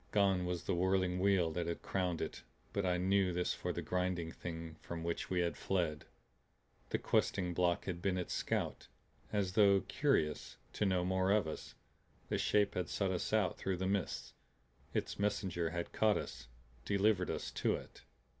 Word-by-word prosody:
Gone 95 -3 +3
was 90 -1 -2
the - - 0
whirling 90 0 +2
wheel 95 -4 +3
that 85 +1 -2
had 85 - -3
crowned 90 -3 -1
it, - - -5 0.3
but 100 -2 0
I 90 0 +2
knew 95 +1 +3
this 90 0 0
for - - -3
the - - -4
Grinding 90 -2 -1
Thing 80 -2 -6
from 85 -1 -5
which 85 0 -2
we 90 -1 +2
had 85 -1 0
fled; 85 -5 -1 0.8
the - - +1
questing 90 -3 +1
block 85 0 +1
had 85 -2 -3
been 95 -1 +1
its 90 - -2
scout. - - -1 0.4
As 100 -3 0
though 100 -2 +6
curious 135 - 0 0.2
to 105 - +1
know 90 -2 +2
more 95 +1 +1
of 100 -4 +3
us, 80 - -6 0.5
the - - 0
Shape 105 -1 +3
had 90 -1 -2
sought 100 -2 0
us 90 - -2
out 105 -5 +2
through 95 -2 -1
the 95 - -2
mists, 95 -4 -1 0.6
its - - -2
messenger 95 -4 0
had 85 0 -4
caught 110 -1 +3
us, 65 -1 -6 0.4
delivered 100 0 +2
us - - -3
to - - +1
it. - - -10
90 Hz, 180 wpm, -35 LUFS, 85-100 Hz, 0.8 s, though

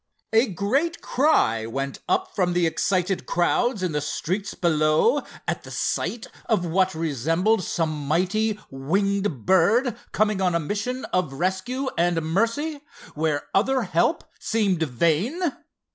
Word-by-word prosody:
A 225 +4 +5
great 260 - 0
cry 115 - +2
went 135 +4 -4
up 375 0 0
from 180 -3 +1
the 175 -1 +2
excited 185 +3 0
crowds 200 +5 +1
in 180 - 0
the 150 -1 -1
streets 185 +7 -3
below, 155 - +3 0.3
at - - -1
the - - -12
sight 235 - -2 0.2
of 215 -6 +1
what 185 +1 +1
resembled 165 - +1
some 155 -4 -2
mighty 200 +7 +1
winged 190 - -1
bird 210 +7 +3 0.2
coming 215 -2 +1
on 180 -2 +2
a - - +3
mission 210 - -3
of 180 -7 0
rescue 190 - -2
and 175 -1 +2
mercy, 230 - 0 0.3
where 150 -1 -1
other 255 +5 +2
help 185 - +1 0.2
seemed 200 -6 0
vain. 165 - +1
185 Hz, 135 wpm, -24 LUFS, 160-225 Hz, 0.3 s, A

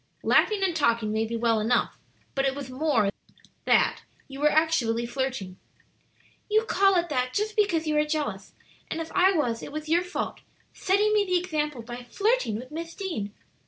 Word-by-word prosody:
"Laughing 420 -3 +3
and 365 -3 +1
talking 230 -7 +1
may 220 +1 0
be 230 - -4
well 230 -1 +2
enough; 225 +3 0 0.3
but 270 - 0
it 270 0 +1
was 275 -2 -7
more 270 -4 +1
than 200 - +1 0.5
that; - - +3 0.3
you 275 0 -9
were 300 +1 +4
actually 270 -8 +2
flirting." 240 -7 -3 0.9
"You 435 +1 +3
call 390 -3 +3
it 345 -1 +1
that 255 -3 -1
just 425 +1 -1
because 375 -7 +2
you 305 -1 0
are - - +4
jealous. 295 -11 -3 0.4
And - - -3
if 325 0 -5
I 375 +1 +4
was, 245 -9 0
it - - -8
was 310 +1 -6
your 340 +2 +4
fault 360 0 -4 0.3
setting 410 +3 +2
me 420 -1 +4
the 365 -2 +1
example 300 -8 -2
by 240 +1 -8
flirting 425 - +1
with 250 +5 -7
Miss 330 +2 -6
Deane." 280 - -4
300 Hz, 190 wpm, -26 LUFS, 235-360 Hz, 0.9 s, were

